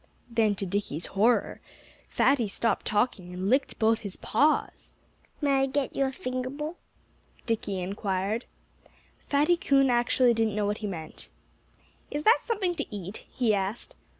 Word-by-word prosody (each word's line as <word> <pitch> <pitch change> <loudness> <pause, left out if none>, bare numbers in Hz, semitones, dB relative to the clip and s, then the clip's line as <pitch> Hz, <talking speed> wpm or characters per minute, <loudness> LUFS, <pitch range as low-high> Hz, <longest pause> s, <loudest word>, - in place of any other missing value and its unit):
Then, 220 -3 +2
to 195 - -3
Dickie's 180 -4 -2
horror, 220 +5 +1 0.5
Fatty 265 -6 +3
stopped 230 +3 -1
talking 205 -5 0
and 190 +4 -1
licked 270 +2 +1
both 220 0 +3
his 200 -3 -6
paws. 295 +7 0 0.5
"May 280 -2 +3
I - - +4
get 275 0 -2
you 275 - +2
a 265 - -1
finger 255 0 -4
bowl?" 300 +5 -5 0.7
Dickie 215 -4 -1
inquired. 195 +3 -2 0.8
Fatty 295 +5 +3
Coon 275 -4 +3
actually 240 0 +3
didn't 225 -2 0
know 210 -1 0
what 205 +1 -1
he 210 - -3
meant. 160 -5 -7 0.8
"Is 295 +1 -3
that 450 +7 +6
something 400 -6 -1
to - - -2
eat?" 195 +1 -7
he 235 -4 +1
asked. 200 - -2
230 Hz, 150 wpm, -28 LUFS, 200-275 Hz, 0.8 s, that